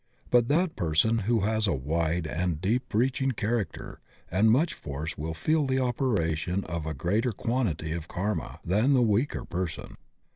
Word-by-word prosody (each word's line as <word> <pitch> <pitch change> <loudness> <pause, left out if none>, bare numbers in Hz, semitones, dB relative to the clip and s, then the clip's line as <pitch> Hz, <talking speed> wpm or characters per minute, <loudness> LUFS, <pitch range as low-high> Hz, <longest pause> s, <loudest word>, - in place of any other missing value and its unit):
But 120 -1 +5
that 165 +4 +1
person 85 +8 +2
who 115 -3 +3
has 110 +1 +1
a 95 - +2
wide 80 +4 -1
and 85 0 -1
deep 120 +8 -1
reaching 130 +4 +1
character 105 -5 -3 0.3
and 100 +5 +4
much 150 +9 +3
force 75 +2 -5
will 80 +2 -4
feel 155 - +1
the 130 0 +1
opera 120 - +1
tion 90 +5 -2
of 80 -2 -4
a 80 - -3
greater 105 - 0
quantity 110 - -1
of 80 -1 -4
karma 100 +6 -3
than 110 +10 +3
the 125 - +4
weaker 115 +5 +1
person. 85 -2 -4
100 Hz, 170 wpm, -28 LUFS, 80-120 Hz, 0.3 s, But